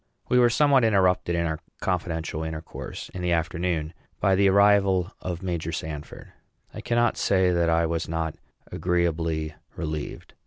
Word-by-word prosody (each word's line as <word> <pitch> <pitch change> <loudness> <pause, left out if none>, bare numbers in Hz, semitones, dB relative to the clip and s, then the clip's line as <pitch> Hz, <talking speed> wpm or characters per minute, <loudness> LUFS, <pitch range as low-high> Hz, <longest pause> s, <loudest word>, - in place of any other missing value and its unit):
We 125 - +4
were 120 -1 +6
somewhat 140 +1 +4
interrupted 95 -5 +2
in 85 0 0
our 80 -1 -2 0.2
confidential 80 -1 -2
intercourse, 80 0 -7
in 90 - -7
the 90 -1 +1
afternoon, 85 -1 -1 0.3
by 95 - +3
the 100 +1 +4
arrival 100 -2 +4
of 90 -1 -4
Major 85 -3 -2
Sanford. 75 -2 -7 0.4
I - - -7
cannot 120 -1 +1
say 95 -2 +3
that 85 -1 +2
I 85 0 +3
was 80 -1 -2
not 80 -1 -2 0.4
agreeably 80 -3 0 0.2
relieved. 80 -3 -5
85 Hz, 150 wpm, -25 LUFS, 80-95 Hz, 0.4 s, were